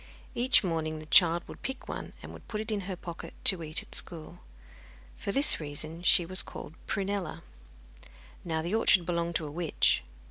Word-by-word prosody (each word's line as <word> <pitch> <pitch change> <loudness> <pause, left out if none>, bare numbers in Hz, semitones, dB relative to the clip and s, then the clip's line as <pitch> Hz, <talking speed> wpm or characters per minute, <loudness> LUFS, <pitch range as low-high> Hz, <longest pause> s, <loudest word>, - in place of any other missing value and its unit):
Each 250 0 +3
morning 160 -3 -2
the 155 - -9
child 170 +1 +5
would - - -11
pick 265 0 -6
one, - - -6
and - - -11
put 210 - -4
it 220 +1 -5
into 200 -3 -3
her 190 - -3
pocket 170 -1 -9
to 190 -3 +4
eat 155 0 +1
at - - -12
school. 160 -3 -4 0.8
For 200 - -4
this 275 +7 +5
reason 155 +2 -4
she 180 0 +4
was 185 +2 +2
called 155 - -9
Prunella. 195 -4 -3 1.0
Now, 160 -2 -2
the 175 +4 -3
orchard 195 -5 +4
belonged 170 -1 -2
to 160 - -1
a 145 - -6
witch. 165 - +2
175 Hz, 180 wpm, -29 LUFS, 160-200 Hz, 1.0 s, child